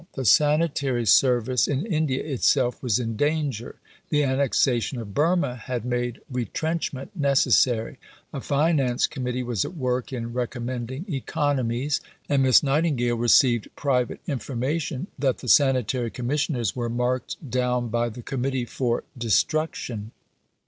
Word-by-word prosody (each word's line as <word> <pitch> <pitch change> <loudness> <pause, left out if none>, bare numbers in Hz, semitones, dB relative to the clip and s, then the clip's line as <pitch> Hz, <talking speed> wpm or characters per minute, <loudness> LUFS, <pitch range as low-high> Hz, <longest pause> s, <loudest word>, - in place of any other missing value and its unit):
The 130 - -4
sanitary 145 -2 +3
service 125 +1 +3
in 145 +5 -1
India 155 - 0
itself 130 -3 +1
was 120 -6 +1
in 115 -2 -3
danger. 145 -3 -1 0.3
The 150 -1 +2
annexation 130 -2 +1
of 105 -3 -7
Burma 155 - +1
had 120 0 -5
made 120 -1 -2
retrenchment 140 - -3
necessary; 130 - +2 0.3
a 140 - -4
Finance 140 -4 +2
Committee 125 -1 -3
was 120 -6 -1
at 180 - -7
work 125 -2 -1
in 120 -2 -5
recommending 125 +3 -4
economies; 140 - -1 0.3
and 140 -2 +2
Miss 130 0 +5
Nightingale 135 -4 +1
received 120 0 +4
private 125 -4 0
information 140 - -2
that 135 -2 +1
the - - -10
Sanitary 130 -2 +3
Commissioners 125 - -1
were 120 -2 -2
marked 125 +2 -1
down 125 -1 0
by 120 +1 0
the 120 +2 -10
Committee 130 -1 -2
for 120 0 -1
destruction. 115 - -1
130 Hz, 130 wpm, -25 LUFS, 120-140 Hz, 0.3 s, Miss